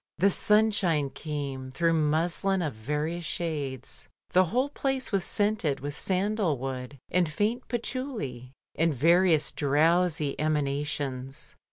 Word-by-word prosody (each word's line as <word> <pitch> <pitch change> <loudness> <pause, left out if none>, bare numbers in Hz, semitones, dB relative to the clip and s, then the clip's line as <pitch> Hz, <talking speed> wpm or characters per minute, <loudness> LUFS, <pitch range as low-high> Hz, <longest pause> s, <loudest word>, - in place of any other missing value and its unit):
The 195 +5 +4
simshine 200 -10 +2
came 140 -4 -5
through 165 +5 +1
muslin 165 +5 +1
of 150 - -2
various 150 +9 -3
shades, 145 -6 -4 0.2
the 185 +1 +5
whole 250 - 0
place 270 -3 -2
was 195 -3 +1
scented 205 -7 0
with 145 +2 -4
sandal 190 -1 0
wood, 130 +1 -5
and 180 -2 +2
faint 220 - -1
patchouli, 235 - -4 0.2
and 165 -2 +1
various 165 +3 +4
drowsy 155 +1 +2
emanations. 140 -3 -2
160 Hz, 120 wpm, -28 LUFS, 140-190 Hz, 0.2 s, the